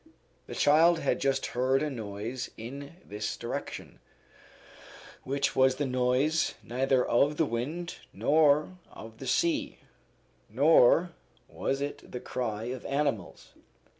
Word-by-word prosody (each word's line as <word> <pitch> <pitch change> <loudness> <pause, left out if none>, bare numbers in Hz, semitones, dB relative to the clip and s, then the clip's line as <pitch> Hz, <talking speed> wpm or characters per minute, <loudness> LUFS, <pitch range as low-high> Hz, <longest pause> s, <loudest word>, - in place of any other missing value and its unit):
The - - -7
child 165 +4 +5
had 140 - 0
just 135 0 +1
heard 130 +3 +2
a 155 - -1
noise 110 +1 -5
in 140 +7 -8
this 105 0 -4
direction, - - -6 1.2
which 140 +1 -1
was 130 0 +4
the 145 - -1
noise 130 +5 +1
neither 130 +1 +1
of 145 +5 +2
the 160 - +3
wind 150 +9 -4
nor 150 +3 +2
of 110 +1 -12
the 135 - -7
sea, 305 - 0 0.7
nor - - +5 0.4
was 135 +1 -3
it 145 +1 -6
the 125 - -5
cry 115 -4 -4
of 125 +2 -5
animals. 140 - -2
135 Hz, 125 wpm, -29 LUFS, 125-150 Hz, 1.2 s, child